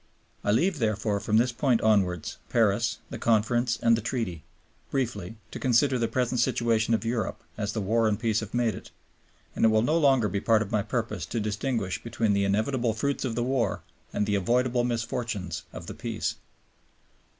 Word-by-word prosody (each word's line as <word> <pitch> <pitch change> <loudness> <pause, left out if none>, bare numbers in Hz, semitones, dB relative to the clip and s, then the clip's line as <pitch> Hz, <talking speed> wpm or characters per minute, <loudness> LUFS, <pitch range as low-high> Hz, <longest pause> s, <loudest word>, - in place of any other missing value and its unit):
I - - -1
leave, 165 - +2
from 110 -1 0
this 120 +2 +3
point 120 0 +2
onwards, 95 -6 +1
Paris, 115 0 +2
the - - -5
Conference, 115 +1 +2
and 115 0 +5
the 115 - -2
Treaty, 105 - -3 0.5
briefly 115 -7 -2 0.2
to - - -6
consider 130 +1 +3
the 115 - +1
present 125 0 0
situation 115 -1 +2
of 115 - -3
Europe, 115 -3 -2
as 105 -1 -3
the 110 - -2
War 110 +3 +2
and 105 -1 +1
the - - -19
Peace 110 -2 +2
have 110 -2 -6
made 120 -2 +1
it; - - -10 0.7
and - - -1
it - - +8
will 110 0 +3
no 155 +7 +2
longer 135 -7 +4
be 100 +1 -2
part 110 -1 +3
of 105 - -10
my 105 -2 +2
purpose 110 -4 -3
to 115 - -2
distinguish 105 -2 -2
between 115 -2 0
the 100 0 +2
inevitable 110 +3 0
fruits 140 +4 -1
of 120 -4 -2
the 120 - 0
War 125 -5 0 0.3
and 105 - 0
the 105 - -1
avoidable 120 +5 +2
misfortunes 115 -4 -3
of - - -8
the - - -6
Peace. - - -3
115 Hz, 190 wpm, -27 LUFS, 105-120 Hz, 0.7 s, it